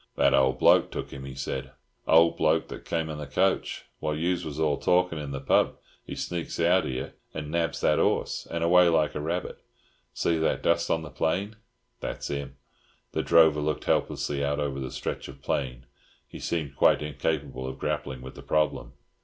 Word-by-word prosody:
"That - - +4
old 65 -1 +3
bloke - - +5
took - - -6
'im," 70 0 -7
he 65 -1 -8
said. 65 -1 -4 0.3
"Old 85 +1 +6
bloke - - +2
that - - -8
come 80 -1 -1
in 75 -1 -5
the 75 - -6
coach. 95 +6 0
While 75 -1 -1
yous 85 +3 0
was 75 -1 -6
all 75 -2 +2
talking 90 -2 +2
in 75 -2 -5
the 70 -1 -4
pub, 70 - +2 0.3
he - - -7
sneaks 85 -1 -4
out 90 +3 +4
here 65 -1 -4 0.2
and 75 -1 -5
nabs 85 -1 -1
that - - +3
'orse, - - 0
and 85 0 -2
away 90 +1 +6
like 80 -2 +2
a 75 - -3
rabbit. 85 +4 -3 0.5
See 85 -1 0
that 80 - 0
dust 85 0 +2
on 80 - +1
the 75 - -9
plain? 95 +7 -1 0.4
That's - - -4
'im." 70 -1 -4 0.6
The - - 0
drover 80 -2 +5
looked 75 0 -1
helplessly 70 -1 0
out 70 +1 0
over 70 -2 -2
the 65 -1 -4
stretch - - -4
of - - -12
plain. 65 -3 -2 0.4
He - - -10
seemed 75 -5 -3
quite - - +4
incapable 70 -2 -2
of 65 - -6
grappling 65 -2 -3
with 65 - -8
the - - -11
problem. 75 0 0
75 Hz, 195 wpm, -27 LUFS, 70-85 Hz, 0.6 s, Old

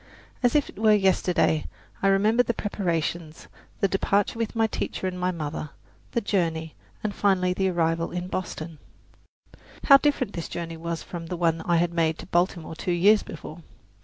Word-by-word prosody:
As 245 +1 +2
if 295 - +3
it - - -12
were 215 -1 +5
yesterday 185 -5 +2 0.3
I 195 - +3
remember 210 +5 +4
the 235 -2 -1
preparations, 170 -5 -3 0.3
the 195 - +4
departure 200 +3 0
with 230 0 -2
my 225 0 +3
teacher 215 - -3
and 180 -1 -3
my 180 0 +1
mother, 155 -3 -4 0.4
the 235 - +1
journey, 165 -6 -1 0.3
and 210 -1 -1
finally 185 -3 +2
the 190 +1 +1
arrival 165 -1 0
in 180 0 -4
Boston. 165 -4 -5 1.0
How 275 - +9
different 275 -6 0
this 165 - -5
journey 165 -1 -5
was 165 0 -4
from 170 -2 -7
the 180 - -4
one 165 -1 +1
I 175 - +3
had 170 +1 +1
made 165 -1 +1
to - - -9
Baltimore 175 -2 0
two 180 - -3
years 205 +5 +5
before! 160 +1 -9
180 Hz, 175 wpm, -25 LUFS, 165-205 Hz, 1.0 s, How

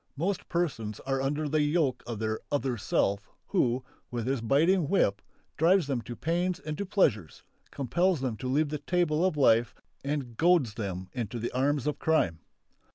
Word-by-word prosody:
Most 185 +5 -2
persons 135 - -2
are 135 0 -1
under 145 +3 -1
the 155 +1 +1
yoke 150 -3 +1
of 120 -2 -4
their 110 0 -2
"other 135 -3 0
self" 100 -1 0 0.2
who, 130 -9 +1 0.3
with 120 -2 -3
his 130 -1 -1
biting 155 +7 +3
whip, 100 - +2 0.4
drives 175 +3 +4
them 135 -4 -1
to 120 +1 -7
pains 175 +4 -1
and 155 -5 -5
to 200 - -3
pleasures, 105 - +1 0.3
compels 170 +6 +1
them 130 -4 -2
to 130 - -5
leave 145 +3 +1
the 150 0 -3
table 175 -2 +1
of 185 -5 +1
life 120 -4 +4 0.3
and 140 -5 -3
goads 165 -10 +3
them 95 -4 -5
into 120 -1 -4
the 115 +1 -3
arms 135 +1 +1
of 150 -1 -1
crime. 95 - +1
140 Hz, 175 wpm, -29 LUFS, 120-165 Hz, 0.4 s, drives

